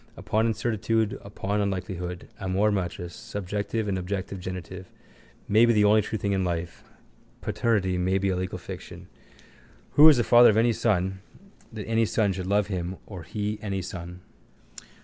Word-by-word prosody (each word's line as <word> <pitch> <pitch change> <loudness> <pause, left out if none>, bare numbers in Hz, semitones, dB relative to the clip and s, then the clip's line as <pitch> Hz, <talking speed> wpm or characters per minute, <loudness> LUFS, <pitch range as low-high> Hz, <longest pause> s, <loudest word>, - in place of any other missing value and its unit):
Upon 110 +2 0
incertitude, 110 -1 0
upon 100 0 -2
unlikelihood. 90 -3 -4
Amor 95 +2 +1
matris, 90 -2 -3
subjective 105 0 -3
and 95 -2 -1
objective 95 +1 -4
genitive, 90 0 -7 0.6
may 110 +3 +5
be 120 0 +5
the 105 -1 +4
only 105 +1 +5
true 110 +2 -3
thing 100 0 -2
in 95 -1 +1
life. 85 -1 -3 0.6
Paternity 95 -6 0
may 95 +2 +1
be 100 0 0
a 95 - +1
legal 90 0 -3
fiction. - - -9 0.8
Who 155 +2 +9
is 150 - +6
the 120 - +2
father 120 +1 +7
of 110 - +2
any 115 +1 +4
son 95 -4 0 0.5
that 110 -3 -6
any 115 0 +2
son 105 -2 +1
should 95 0 -5
love 100 +1 +2
him 95 -2 -4
or 95 -4 -8
he 105 +4 -4
any 100 -3 -3
son? 90 0 -8
100 Hz, 165 wpm, -26 LUFS, 95-110 Hz, 0.8 s, Who